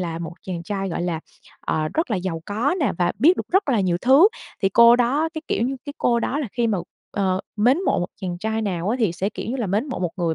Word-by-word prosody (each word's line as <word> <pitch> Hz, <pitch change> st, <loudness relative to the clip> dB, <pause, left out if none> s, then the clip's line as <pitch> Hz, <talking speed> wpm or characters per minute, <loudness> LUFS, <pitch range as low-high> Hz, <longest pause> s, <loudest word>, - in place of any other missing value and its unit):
là 165 Hz, -2 st, -3 dB
một 170 Hz, 0 st, -6 dB
chàng 175 Hz, -3 st, -5 dB
trai, 195 Hz, +1 st, -3 dB
gọi 175 Hz, -, -3 dB
là, 170 Hz, -2 st, -2 dB, 0.4 s
ờ, 155 Hz, 0 st, -1 dB
rất 320 Hz, -4 st, 0 dB
là 215 Hz, -, +1 dB
giàu 180 Hz, -3 st, -3 dB
có 230 Hz, +10 st, 0 dB
nè 285 Hz, -, +2 dB
và 175 Hz, -1 st, +2 dB
biết 325 Hz, -, +5 dB
được -, -, -4 dB
rất 385 Hz, -3 st, +3 dB
là 240 Hz, -6 st, +3 dB
nhiều 180 Hz, -3 st, +1 dB
thứ, 275 Hz, +10 st, +6 dB, 0.3 s
thì 195 Hz, -, +4 dB
cô 235 Hz, +4 st, +7 dB
đó 265 Hz, +6 st, +2 dB
cái, 315 Hz, -, -5 dB
kiểu -, -, 0 dB
như, 265 Hz, +3 st, -1 dB
cái 285 Hz, -, -6 dB
cô 235 Hz, -1 st, +2 dB
đó 275 Hz, -, -1 dB
là 290 Hz, -6 st, -3 dB
khi 240 Hz, -1 st, +1 dB
mà, 210 Hz, -4 st, 0 dB, 0.3 s
ờ, 190 Hz, -2 st, 0 dB, 0.2 s
mến 245 Hz, +8 st, +4 dB
mộ -, -, +2 dB
một 175 Hz, -, -1 dB
chàng 180 Hz, -3 st, -4 dB
trai 220 Hz, +3 st, -2 dB
nào 185 Hz, -3 st, -2 dB
á 235 Hz, -, +1 dB
thì 210 Hz, -7 st, +2 dB
sẽ, 190 Hz, +4 st, -2 dB
kiểu -, -, -6 dB
như 260 Hz, -, -2 dB
là, 235 Hz, -5 st, -2 dB
mến 205 Hz, +8 st, 0 dB
mộ 255 Hz, -, -4 dB
một 180 Hz, -2 st, -1 dB
người 170 Hz, -3 st, 0 dB
210 Hz, 280 wpm, -22 LUFS, 180-250 Hz, 0.4 s, cô